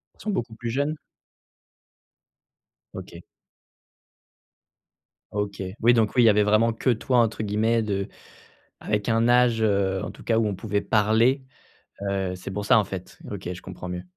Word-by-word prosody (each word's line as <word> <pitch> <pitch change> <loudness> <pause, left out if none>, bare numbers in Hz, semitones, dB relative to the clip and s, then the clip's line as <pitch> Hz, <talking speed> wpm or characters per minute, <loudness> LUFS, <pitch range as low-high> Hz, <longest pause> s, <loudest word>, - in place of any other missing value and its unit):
Ils - - -33
sont 215 - -2
beaucoup 115 - -3
plus 120 +1 -5
jeunes? 145 +5 -1 2.0
OK. - - -9 2.1
OK. 105 -1 -3 0.2
Oui 120 +2 +6
donc 110 -3 +1
oui, 125 - +5
il - - +6
y - - +8
avait 105 0 +4
vraiment 110 +3 +3
que 115 +3 -1
«toi» 125 +2 0
entre 115 -1 +1
guillemets 110 +2 +1
de 100 -3 -2 0.7
avec 105 0 -2
un 115 0 +2
âge, 120 -2 +4
heu, 100 -3 +1
en - - -5
tout - - -13
cas 115 - +1
où 115 - +2
on 105 - -1
pouvait 100 +1 -2
parler, 115 +5 +2 0.6
heu, 95 -2 -2
c'est 90 +1 -8
pour 105 +2 -3
ça, 120 +3 +5
en 110 - +4
fait. 95 -2 -8
OK, 95 -3 -5
je 90 - -8
comprends 90 -1 -8
mieux. 90 0 -5
110 Hz, 170 wpm, -25 LUFS, 100-115 Hz, 2.1 s, y